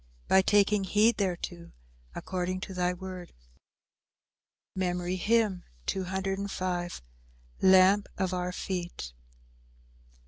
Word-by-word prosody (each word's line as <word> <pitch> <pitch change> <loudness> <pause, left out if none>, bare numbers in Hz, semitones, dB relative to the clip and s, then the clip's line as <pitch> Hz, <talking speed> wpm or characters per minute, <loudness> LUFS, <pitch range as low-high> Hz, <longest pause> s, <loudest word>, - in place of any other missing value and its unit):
By 190 - +6
taking 205 +1 +3
heed 215 +5 +3
thereto 175 -3 -3 0.4
according 185 0 -3
to 190 - -6
thy 180 -1 +1
word." 180 -1 -8 1.4
MEMORY 180 -1 -1
HYMN 210 -2 +2 0.2
_"Lamp 185 - 0
of 185 -1 -1
our 180 0 -1
feet." 175 - -5
185 Hz, 80 wpm, -29 LUFS, 175-195 Hz, 1.4 s, By